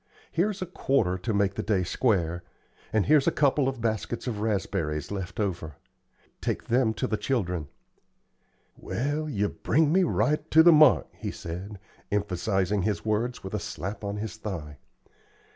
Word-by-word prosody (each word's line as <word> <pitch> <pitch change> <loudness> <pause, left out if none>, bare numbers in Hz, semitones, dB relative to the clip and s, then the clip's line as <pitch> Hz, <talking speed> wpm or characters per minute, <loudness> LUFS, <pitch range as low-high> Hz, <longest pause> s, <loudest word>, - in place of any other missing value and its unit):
Here's 190 +2 0
a - - -4
quarter 130 - 0
to 95 +5 -2
make 100 -2 +2
the - - -3
day 100 -4 +1
square, 85 -5 0 0.5
and 110 -3 +2
here's 150 -2 +4
a - - +5
couple 140 -1 +2
of 130 -3 -3
baskets 110 +1 -2
of 115 -5 -3
raspberries 95 -8 -1
left 95 -1 -5
over. 85 -7 -2 0.7
Take - - -2
them 120 -2 +2
to 130 - -1
the 110 -4 -1
children." 90 - -1 1.1
"Well, 145 +5 -2
yer 105 -6 0
bring 155 0 +1
me 190 - +5
right 150 -3 +1
to 160 +1 +7
the 170 - +8
mark," 155 -3 +6
he - - -5
said, 95 +5 -6 0.3
emphasizing 100 0 0
his 95 -3 -1
words 110 +3 -1
with 95 - -7
a 105 - 0
slap 105 0 -5
on 100 0 -3
his 110 +1 -5
thigh. 80 -10 -6
105 Hz, 160 wpm, -27 LUFS, 95-130 Hz, 1.1 s, the